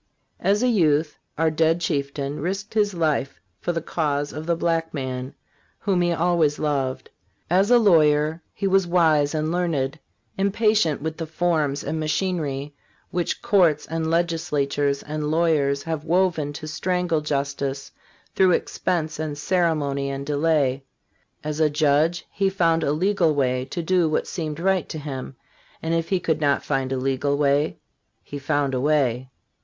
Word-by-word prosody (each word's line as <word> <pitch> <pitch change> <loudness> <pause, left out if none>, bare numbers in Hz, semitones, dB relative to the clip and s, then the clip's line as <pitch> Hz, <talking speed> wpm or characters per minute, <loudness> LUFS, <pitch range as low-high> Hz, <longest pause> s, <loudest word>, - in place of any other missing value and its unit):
As 205 +4 +2
a - - +3
youth 155 -9 +2 0.2
our 160 0 +2
dead 160 +1 +2
chieftain 140 -2 -2
risked 195 +6 -3
his 205 -3 +1
life 155 -5 -1 0.2
for - - -1
the 165 -2 -3
cause 145 -4 -1
of 155 +2 -6
the 170 - +2
black 165 -1 -1
man, 130 -1 -4 0.4
whom 190 -3 0
he 175 0 +2
always 165 -3 +2
loved. 135 -4 -2 0.4
As 190 +4 +3
a 245 - +7
lawyer 155 -6 +3
he - - -4
was 195 -1 +3
wise 160 -4 +3
and 155 +1 -1
learned, 160 -5 -1 0.4
impatient 200 -6 +2
with 160 0 -3
the 165 - -4
forms 155 -4 0
and 160 - -3
machinery 155 -4 -2 0.4
which 175 -1 -2
courts 180 -10 +3
and 160 0 -2
legislatures 145 -4 0
and 150 0 -3
lawyers 150 -4 +1
have 160 -2 -3
woven 165 -3 +1
to 155 - -7
strangle 175 0 -1
justice 140 -1 -3 0.4
through 185 -2 +4
expense 160 -4 -1
and 155 -2 -3
cere 170 +2 +1
mony 140 -2 -2
and 140 0 -4
delay; 145 -3 +1 0.6
as 150 0 -3
a 155 -1 +4
judge 150 +3 +2
he 195 -1 +1
found 165 -4 +2
a 140 - +1
legal 170 0 +2
way 130 -2 0
to 170 +6 -5
do 175 -1 +2
what 155 - 0
seemed 155 -3 -4
right 190 0 +1
to - - -5
him, 135 -3 -6 0.4
and 160 +1 -2
if 165 0 -1
he 190 - +2
could 160 -2 -1
not 140 -1 +2
find 135 -2 -1
a 135 - 0
legal 135 +2 0
way, 145 +1 +1 0.5
he 145 - -7
found 145 -1 0
a 125 - 0
way. 130 -4 +1
155 Hz, 160 wpm, -23 LUFS, 145-170 Hz, 0.6 s, a